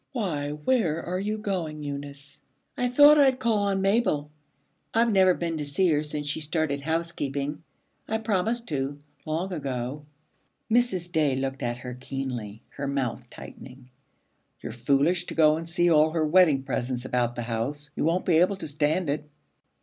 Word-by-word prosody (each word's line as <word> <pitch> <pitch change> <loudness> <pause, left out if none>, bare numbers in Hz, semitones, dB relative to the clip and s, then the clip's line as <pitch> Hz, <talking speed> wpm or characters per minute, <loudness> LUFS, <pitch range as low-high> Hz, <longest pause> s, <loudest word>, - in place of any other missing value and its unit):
'Why, 165 - -2
where 160 - 0
are 180 +1 -3
you 210 +2 -2
going, 175 -8 -3
Eunice?' 140 0 -7 0.3
'I 250 - 0
thought 290 +4 +7
I'd 265 -2 +5
call 230 -4 +1
on 200 -1 0
Mabel. 195 -8 +1 0.6
I've 230 0 +3
never 190 -3 +5
been 170 -1 -3
to 150 - -3
see 170 +6 +2
her 150 -1 +2
since 150 -1 -5
she 145 +2 -2
started 155 -2 -1
housekeeping. 150 -2 -2 0.5
I 220 - 0
promised 220 +2 -1
to, 140 -1 -2 0.3
long 170 +5 -2
ago.' 135 -2 -4 0.7
Mrs. 205 -8 +1
Day 150 -5 +2
looked 135 0 -3
at 120 0 -2
her 125 0 -7
keenly, 125 -4 -6
her 140 - -5
mouth 130 -3 -3
tightening. 130 -1 -12 0.7
'You're - - -6
foolish 140 +9 +1
to - - -5
go 155 -1 +5
and 165 +1 -5
see 175 0 +2
all 155 0 +5
her 160 -1 0
wedding 155 -4 +4
presents 125 -2 -3
about 120 -2 0
the 120 - -3
house. 130 +6 -3
You - - -1
won't 165 +4 +1
be 170 -3 +4
able 185 +4 +3
to 190 - -6
stand 155 +4 0
it.' 150 +1 -3
155 Hz, 170 wpm, -26 LUFS, 140-185 Hz, 0.7 s, thought